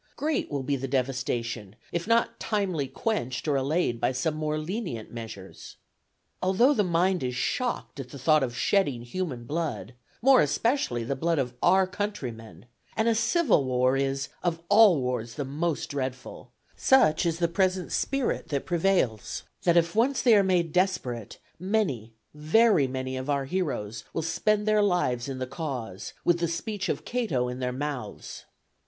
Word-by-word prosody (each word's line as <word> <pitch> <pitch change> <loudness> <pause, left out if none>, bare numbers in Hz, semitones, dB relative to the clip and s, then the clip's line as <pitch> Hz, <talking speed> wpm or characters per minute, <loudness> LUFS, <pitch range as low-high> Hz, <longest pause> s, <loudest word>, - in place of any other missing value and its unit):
Great 305 0 -1
will 140 -2 -3
be 140 +2 0
the 135 0 -4
devastation, 125 -5 -2 0.2
if 170 +2 -3
not 230 +1 +2
timely 190 -10 -1
quenched 135 - -2
or 145 - +2
allayed 135 -3 0
by - - +2
some 135 +5 -1
more 155 0 -2
lenient 165 - -4
measures. 110 -5 -9 0.7
Although 195 +10 +4
the 210 - +2
mind 180 +1 +1
is 125 -1 -2
shocked 245 - -2
at 130 -2 -6
the 140 - -9
thought 155 +3 +3
of 125 -2 -2
shedding 140 -6 +1
human 130 -2 -4
blood, 145 - -3 0.3
more 265 +1 +6
especially 150 - 0
the 135 +4 -2
blood 165 +4 0
of 125 -3 -1
our 190 0 +5
countrymen, 125 - -5 0.3
and 220 +1 +2
a 230 - +4
civil 230 - +3
war 130 0 +2
is 135 0 -1
of 170 -2 -1
all 205 -6 +7
wars 125 -3 -3
the 145 - -3
most 155 +4 -2
dreadful, 130 -2 -5 0.2
such 155 -14 +4
is 165 -2 0
the 170 -1 +2
present 185 +2 0
spirit 275 -2 -1
that 140 -3 -2
prevails, 170 - 0 0.2
that 170 -1 +4
if 170 0 +3
once 255 +5 +2
they 235 -3 +6
are 205 - +6
made 180 -4 +1
desperate, 130 - -1 0.2
many, 180 - -1 0.2
very 155 - +4
many 130 0 -4
of 130 +2 -5
our 140 -1 +1
heroes 125 - -3
will 165 - -2
spend 210 +6 0
their 215 0 +4
lives 140 -11 +1
in 135 - -4
the 130 - -2
cause, 130 - -5
with 175 0 +3
the 170 - +1
speech 190 +4 -3
of - - -2
Cato 175 - -1
in 125 +1 -5
their 125 -1 -1
mouths. 130 -5 -5
155 Hz, 170 wpm, -27 LUFS, 130-190 Hz, 0.7 s, all